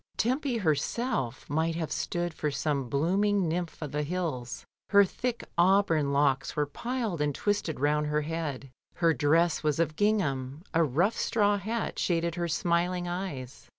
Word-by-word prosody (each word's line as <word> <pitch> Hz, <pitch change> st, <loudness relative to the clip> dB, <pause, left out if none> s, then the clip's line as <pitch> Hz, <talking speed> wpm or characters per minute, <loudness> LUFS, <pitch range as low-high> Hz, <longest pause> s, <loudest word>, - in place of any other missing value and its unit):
Tempy 255 Hz, +1 st, 0 dB
herself 175 Hz, -, -1 dB
might 160 Hz, +2 st, 0 dB
have 165 Hz, -2 st, -3 dB
stood 175 Hz, -1 st, -2 dB
for 150 Hz, -, -2 dB
some 140 Hz, -3 st, -1 dB
blooming 190 Hz, -, +2 dB
nymph 170 Hz, +1 st, -3 dB
of 150 Hz, -, -5 dB
the 150 Hz, -, -1 dB
hills. 150 Hz, -7 st, -3 dB, 0.2 s
Her 200 Hz, -1 st, +7 dB
thick 240 Hz, +5 st, -4 dB
auburn 170 Hz, -6 st, +4 dB
locks 140 Hz, -1 st, +1 dB
were 150 Hz, -, +1 dB
piled 225 Hz, -, -3 dB
and 145 Hz, -2 st, 0 dB
twisted 205 Hz, -8 st, -1 dB
round 150 Hz, +1 st, +1 dB
her 150 Hz, 0 st, +1 dB
head; 150 Hz, -4 st, -4 dB, 0.2 s
her 165 Hz, -2 st, +3 dB
dress 160 Hz, +5 st, +2 dB
was 150 Hz, -2 st, +1 dB
of 155 Hz, -2 st, +1 dB
gingham, 155 Hz, -9 st, 0 dB
a 165 Hz, -, +4 dB
rough 165 Hz, -, +1 dB
straw 205 Hz, -2 st, +2 dB
hat 220 Hz, +3 st, -3 dB
shaded 170 Hz, -1 st, 0 dB
her 175 Hz, 0 st, -2 dB
smiling 175 Hz, +2 st, 0 dB
eyes. 175 Hz, -8 st, -5 dB
165 Hz, 155 wpm, -29 LUFS, 145-195 Hz, 0.2 s, Her